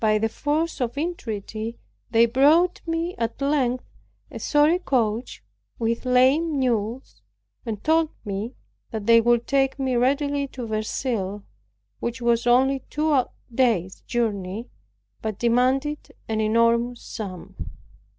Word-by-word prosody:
By 215 -1 +4
the 225 +1 0
force 300 +6 -1
of 245 +2 -2
entreaty, 225 - -4 0.3
they 230 0 +5
brought 295 +9 +4
me 330 +2 -1
at 230 +2 -2
length 275 -3 +1 0.5
a - - -7
sorry 300 +4 +3
coach 235 - -1 0.3
with 230 +2 -1
lame 275 +5 +3
mules, 240 -1 -2 0.5
and 215 -3 -4
told 320 0 +3 0.2
me 205 +5 -4 0.3
that 220 -2 -5
they 230 +1 +6
would 240 0 +2
take 270 0 +1
me 265 -2 0
readily 280 +3 +1
to 255 -2 -7
Verceil, 215 -2 -2 0.6
which 235 +1 -3
was 235 0 +1
only 265 +3 +4
two 305 0 +1 0.4
days 225 -8 +1
journey, 215 -2 -2 0.5
but 215 -3 -3
demanded 260 +5 +1 0.2
an 220 -1 -1
enormous 230 +2 +2
sum. 185 -5 -7
240 Hz, 125 wpm, -24 LUFS, 225-275 Hz, 0.6 s, they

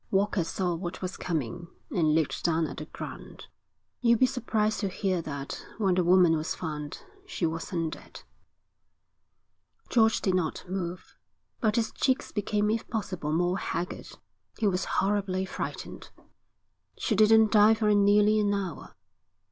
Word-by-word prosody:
Walker 195 -1 +1
saw 175 +2 -1
what 175 +2 -5
was 185 - -3
coming 165 0 -3 0.2
and 155 -4 +2
looked 160 -3 0
down 165 -1 +2
at 140 - -7
the 155 - -5
ground. - - -9 0.6
'You'll 235 -1 +4
be 255 - +5
surprised 220 -4 0
to 200 - 0
hear 185 -1 -1
that 140 -3 -6
when 195 -4 +2
the 180 0 +2
woman 175 -1 +5
was 155 0 -2
found 150 -3 -6 0.2
she 185 - -2
wasn't 165 0 -2
dead.' - - -12 1.7
George 225 -2 +4
did 190 - 0
not 175 -4 -1
move, 180 -1 -5 0.4
but 215 -3 +1
his 230 -2 0
cheeks 260 -1 0
became 210 0 0
if 225 +1 -2
possible 185 -8 -3
more 175 +3 +1
haggard. 180 - -4 0.5
He 220 - -1
was 185 -2 +1
horribly 195 -1 0
frightened. - - -6 0.9
'She 225 - -1
didn't 220 +1 +5
die 215 +1 +6
for 215 -1 +2
nearly 205 +1 +4
an 205 -1 +2
hour.' 190 -5 -5
190 Hz, 150 wpm, -28 LUFS, 170-210 Hz, 1.7 s, die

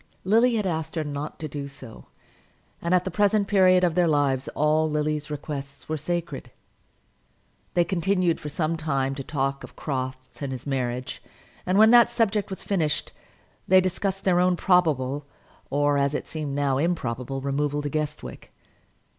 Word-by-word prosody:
Lily 230 +5 +4
had 210 -2 0
asked 160 -3 -2
her 160 - 0
not 145 0 -5
to 155 - -5
do 140 -1 -5
so, 135 -5 -11 0.7
and 170 - -2
at 180 -1 +4
the 190 - -3
present 205 +1 +2
period 185 -2 +5
of 175 -2 +3
their 175 0 +3
lives 140 -4 +1
all 155 +1 +2
Lily's 150 0 -1
requests 145 -1 -6
were 155 - -1
sacred. 155 -4 -4 1.3
They 175 - +5
continued 180 0 +1
for 150 - -6
some 155 +2 -1
time 135 -4 -1
to 135 0 -6
talk 135 -1 -2
of - - -11
Crofts 130 -2 -5
and 140 -2 -3
his 130 -2 -6
marriage; 125 -2 -3 0.5
and 185 +2 +2
when 220 +1 +7
that 240 -1 +7
subject 220 -4 0
was 190 - -6
finished, 160 -7 -1 0.5
they 185 0 +7
discussed 190 +1 -1
their 180 -2 +3
own 180 0 +3
probable, 145 -7 +1 0.4
or, 145 0 +2
as 140 +1 +1
it - - -3
seemed 150 -3 -4
now, 140 -2 +1
improbable, 135 -5 -2
removal 145 +2 -1
to 145 - -2
Guestwick. 150 0 -5
155 Hz, 165 wpm, -25 LUFS, 140-180 Hz, 1.3 s, when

